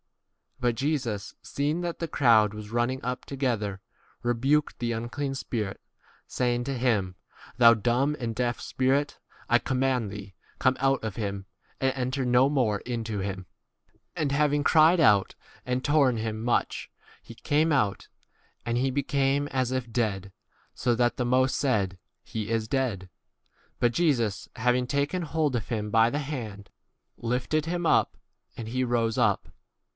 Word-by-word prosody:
But 120 -2 +1
Jesus, 125 -7 -2
seeing 150 +4 -1
that 175 -1 -3
the 165 - -2
crowd 110 -8 +4
was 105 -1 -8
running 120 +3 0
up 125 +1 -3
together, 115 -8 -2 0.4
rebuked 135 +5 +1
the 120 -1 -2
unclean 120 +5 -3
spirit, 110 -6 -4 0.5
saying 120 -1 0
to 135 -1 -2
him, 105 -7 0 0.4
Thou 115 -1 +8
dumb 125 +6 +1
and 115 -3 -3
deaf 120 0 -1
spirit, 135 +3 0 0.3
I 120 - +6
com 125 +1 -2
mand 130 -6 +1
thee, 100 -1 -9 0.3
come 130 0 +2
out 135 -1 +1
of 110 -4 -4
him 100 -3 -4 0.3
and 135 - +2
26 135 - -8
enter 130 +1 -1
no 125 +2 +4
more 120 -8 +1
into 115 -3 -4
him. 95 -1 -4 0.7
And 155 -5 -1
having 145 0 +2
cried 160 +3 +5
out 105 -10 +4 0.3
and 125 0 -1
torn 140 -5 +3
[him] 110 +1 -2 0.2
i - - -5
much, 120 - -1 0.3
he 115 - -12
came 155 +6 +1
out; 105 -9 +1 0.6
and 120 0 0
he 130 +2 +1
became 140 +1 +1
as 130 -3 -1
if 130 -2 -3
dead, 100 -5 -1 0.4
so 120 - 0
that 120 +1 +1
the 125 - 0
most 130 +1 +2
r - - -1
said, 105 -9 +1
2? 95 - -16 0.3
He 110 -2 -5
is 115 -1 0
dead. 110 -8 -1 0.7
But 120 -1 +2
Jesus, 120 - +1
having 125 +2 +1
taken 145 +7 -1
hold 155 -4 0
of 115 - -3
him 105 -2 -2
by 115 +1 +5
the 145 - -2
hand, 115 -9 -6 0.5
lifted 125 +6 -1
him 175 +1 -2
up, - - +2 0.4
and 115 - -6
he 130 +3 -1
rose 115 -2 0
up. - - +2
125 Hz, 165 wpm, -27 LUFS, 115-140 Hz, 0.7 s, Thou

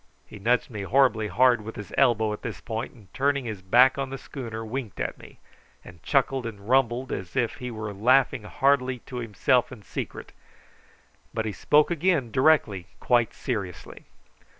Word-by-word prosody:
He - - -12
nudged 120 +5 +1
me 105 -3 -5
horribly 115 0 +2
hard 125 +1 +3
with 110 +1 -8
his 105 -3 -9
elbow 110 -3 +3
at 105 - -7
this - - -6
point, 115 +2 -5
and 105 -6 -19
turning 140 -1 0
his 110 -5 -5
back 125 +8 +5
on 135 -1 -2
the 135 - -5
schooner 115 -5 -7
winked 115 -2 -5
at - - -3
me, - - -14 0.5
and 90 -3 -13
chuckled 135 - +1
and 105 -2 -9
rumbled 125 0 +2
as 95 -2 -5
if 120 -3 0
he 125 - -5
were 110 -2 -5
laughing 130 +4 +3
heartily 130 +2 +1
to 125 - -7
himself 120 +2 +1
in 115 -5 -11
secret; - - -6 1.0
but 110 -1 -1
he 110 - -2
spoke 150 - +3
again 165 -7 +1
directly 125 - +2
quite 120 -3 +2
seriously. 100 -9 -5
120 Hz, 175 wpm, -26 LUFS, 110-130 Hz, 1.0 s, back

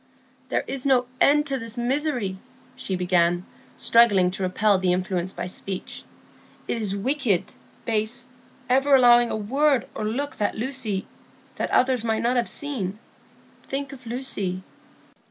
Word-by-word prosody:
"There - - 0
is 270 -2 -1
no 260 -3 +3 0.2
end 295 +1 +5
to 275 -2 -1
this 230 0 -5
misery," 245 -6 -1 0.4
she 190 - -3
began, 175 0 +1 0.3
struggling 205 -6 +4
to 190 - -6
repel 190 +2 +2
the 185 -1 +2
influence 185 0 -2
by - - -5
speech. 185 +1 -6 0.7
"It 230 - -1
is 200 -2 -1
wicked—base—ever 250 - -1
allowing 240 -2 +6
a - - -2
word 270 +4 +1
or - - -5
look 260 +7 -3
that 210 - -1
Lucy—that 225 -5 -5
others 255 -2 +2
might 225 -1 0
not 245 +2 +2
have 240 -2 +1
seen. 220 -10 -2 0.6
Think 275 0 -5
of 255 -3 -12
Lucy." 205 -7 0
235 Hz, 135 wpm, -24 LUFS, 195-260 Hz, 0.7 s, allowing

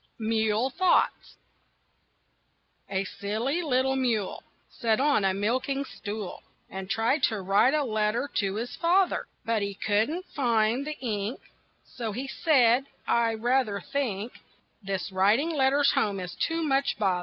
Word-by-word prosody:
MULE 220 +2 0
THOUGHTS 370 +5 +1 1.5
A 195 0 0
silly 220 - -2
little 265 -3 +1
mule 235 -7 -1 0.3
Sat 225 -3 0
on 280 -6 +3
a 195 - +3
milking 255 +7 -1
stool 210 -5 -6 0.3
And 190 0 -6
tried 230 +8 +1
to 220 - -2
write 200 +9 +3
a 300 - +2
letter 220 +2 0
to 195 -1 0
his 235 +3 -4
father. 360 +2 +2 0.2
But 230 -2 +1
he 200 0 -3
couldn't 220 - 0
find 235 0 +1
the 305 - -4
ink, 215 -1 -3 0.5
So 225 -4 -5
he 260 +5 -4
said: 265 -5 +3 0.2
"I 230 -1 +2
rather 235 -2 +1
think 235 -2 -3 0.5
This 195 -2 -3
writing 210 - +3
letters 280 -1 +3
home 200 -2 0
is 180 -1 -6
too 330 0 -1
much 275 -2 +1
bother." 190 -4 +1
230 Hz, 140 wpm, -27 LUFS, 205-270 Hz, 1.5 s, on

